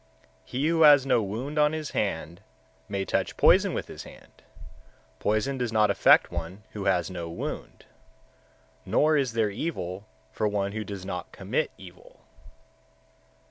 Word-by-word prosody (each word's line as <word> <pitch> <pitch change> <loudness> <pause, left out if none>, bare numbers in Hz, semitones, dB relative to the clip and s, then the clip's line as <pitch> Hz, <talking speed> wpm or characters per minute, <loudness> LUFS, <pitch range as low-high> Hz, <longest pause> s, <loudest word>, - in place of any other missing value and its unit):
124. - - -19
He 145 - +2
who 165 0 +2
has 145 -3 +8
no 130 -4 +3
wound 120 +9 -3
on 150 +1 +4
his 155 -2 -4
hand, 85 -3 -3 0.5
may 100 -1 -2
touch - - -1
poison - - +5
with - - -4
his - - -9
hand; - - -15 0.8
poison 110 +6 0
does 120 -2 -1
not 105 -2 +3
affect - - +5
one 85 +4 -6
who 100 -2 -6
has 90 -2 +1
no 85 -2 -5
wound; 85 - -6 1.0
nor 155 +1 +2
is 135 -5 +1
there 110 -2 +1
evil 100 - -4 0.2
for 110 - -1
one 100 -1 -1
who 110 +1 -4
does 100 -3 -7
not 90 -4 -5
commit - - -2
evil. 90 -1 -15
105 Hz, 155 wpm, -27 LUFS, 95-135 Hz, 1.0 s, has